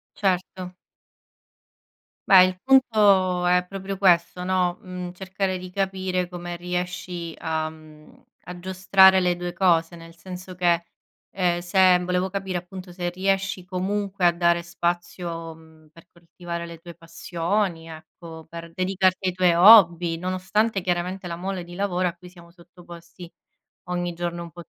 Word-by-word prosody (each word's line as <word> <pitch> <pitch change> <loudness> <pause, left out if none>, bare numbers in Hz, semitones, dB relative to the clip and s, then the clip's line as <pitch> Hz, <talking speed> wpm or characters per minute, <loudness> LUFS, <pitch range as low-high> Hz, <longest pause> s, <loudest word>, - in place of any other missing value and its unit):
Certo. 185 -1 -2 1.6
Beh, 190 -2 +9
il 185 0 -1
punto 205 -9 +3
è 180 0 +3
proprio 195 +1 -6
questo, 180 -1 +2
no, 180 -1 0
mhmm, 180 -1 -7
cercare 190 0 -3
di 185 0 -9
capire 190 -1 -2
come 175 -1 -7
riesci 180 -1 -5
a 160 -1 -2
mhmm, 155 -1 -17 0.3
a 180 0 -8
giostrare 190 +1 +4
le 180 -1 +1
2 175 0 -5
cose, 170 -2 +2
nel 165 0 -13
senso 185 +2 -10
che, 175 -1 +1 0.5
ehm, 175 -2 0
se 185 +1 +4
volevo 180 +1 -1
capire, 190 -1 -3
appunto, 180 +1 -9
se 175 0 -4
riesci 195 0 -1
comunque 195 +1 -2
a 175 - +5
dare 170 0 +2
spazio, 170 -1 -4
mhmm, 160 -1 -20
per 165 +2 -19
coltivare 170 0 -8
le 170 -1 -10
tue 170 0 -12
passioni, 170 +1 -3
ecco, 160 0 -12
per 170 0 -10
dedicarti 185 0 0
ai - - -5
tuoi 180 -1 +3
hobby, 175 -3 +6
nonostante, 190 +4 -1
chiaramente, 180 +1 -3
la 170 -1 -5
mole 185 0 -4
di 175 0 -11
lavoro 185 -2 0
a - - -8
cui 180 0 -15
siamo 170 -1 -17
sottoposti 170 0 -14 0.5
ogni 175 -1 -3
giorno 170 0 -4
un 170 - -11
po' 175 +3 -11
180 Hz, 150 wpm, -24 LUFS, 170-185 Hz, 1.6 s, Beh